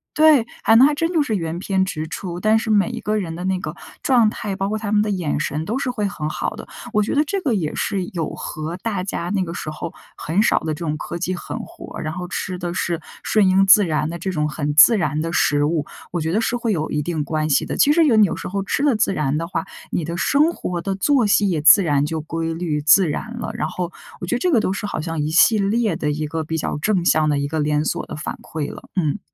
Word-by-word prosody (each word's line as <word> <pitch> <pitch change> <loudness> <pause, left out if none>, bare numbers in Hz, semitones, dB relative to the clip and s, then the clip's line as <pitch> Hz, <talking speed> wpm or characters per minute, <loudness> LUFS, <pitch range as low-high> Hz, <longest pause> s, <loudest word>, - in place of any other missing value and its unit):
对， 305 -6 +5 0.2
还 225 - +5
能 250 +4 +8
还 300 - +1
真 330 +4 -1
就 325 - +3
是 220 -6 -2
原 165 0 -4
片 190 0 0
直 155 -5 -4
出。 175 +1 -5
但 215 +2 +3
是 220 - -4
每 210 -1 +3
一 235 -1 -5
个 215 -1 -1
人 165 -5 -3
的 180 - -5
那 190 0 +1
个 155 -2 -6 0.3
状 240 -5 +4
态， 210 -2 -5
包 195 0 -2
括 215 +2 -1
他 210 -1 -4
们 210 -1 +4
的 210 - -1
眼 175 -7 -1
神 155 0 -2
都 235 +8 -2
是 270 -2 -1
会 210 -5 -1
很 155 -6 -4
好 155 - -3
的。 - - -9 0.2
我 210 -2 +2
觉 210 - -2
得 295 - +4
这 390 +7 -2
个 275 -9 0
也 160 -6 -2
是 195 -2 -1
有 165 -4 -3
和 155 +2 -5
大 200 -1 -3
家 180 -2 -4
那 195 -2 +1
个 170 - -6
时 155 - -5
候 155 +2 -6 0.2
很 175 +7 0
少 - - +3
的 155 -1 -3
这 - - -8
种 150 0 -2
科 170 - -5
技 185 +1 -2
狠 - - -6
活 - - -10
儿， - - -5
然 155 - -3
后 180 +1 -5
吃 185 0 -4
的 175 -1 -4
是 170 -2 -1 0.2
顺 210 -3 +3
应 195 +1 +4
自 200 0 +7
然 155 -1 -1
的 170 +1 -6
这 190 - -3
种 150 -3 -1
很 145 -1 -2
自 210 +9 +8
然 155 -4 -1
的 165 +1 -3
食 145 -3 +2
物， 150 -1 0 0.3
我 175 - -2
觉 160 +1 -2
得 215 - +2
是 235 +1 0
会 235 -3 -1
有 155 -2 -2
一 150 - 0
定 155 -1 -2
关 155 +1 -2
系 140 - +2
的。 - - -4
其 290 - +5
实 335 +1 +4
有 245 -7 +4
你 215 - +7
有 - - -3
时 - - -6
候 195 +1 -2
吃 235 - -1
得 285 -5 +3
自 205 - +1
然 150 -3 0
的 165 +1 -3
话， - - -2 0.3
你 170 - -1
的 170 +2 -4
生 295 - +3
活 180 - -4
的 195 +2 -2
作 250 +3 +2
息 205 0 +3
也 160 -4 0
自 155 +6 +8
然 145 -4 +1
就 160 +1 -3
规 165 +1 -3
律、 160 -3 -2
自 165 +5 +5
然 230 +10 -5
了， - - -4
然 225 - -2
后， 180 -1 -4 0.3
我 - - -5
觉 210 - -1
得 - - -1
这 360 - +1
个 250 - +4
都 190 -3 0
是 205 - -4
好 205 - -3
像 165 0 -4
一 150 - -1
系 185 +7 +5
列 215 +2 +1
的 150 -1 -1
一 150 +1 -3
个 160 +1 -3
比 160 +1 -3
较 155 - -2
正 185 +1 0
向 155 -2 +3
的 145 - +1
一 140 - -1
个 160 +2 -3
连 150 +1 +1
锁 - - -2
的 - - -7
反 150 - -5
馈 155 -2 -5
了， - - -13
嗯。 165 -1 0
180 Hz, 305 characters per minute, -21 LUFS, 155-215 Hz, 0.3 s, 能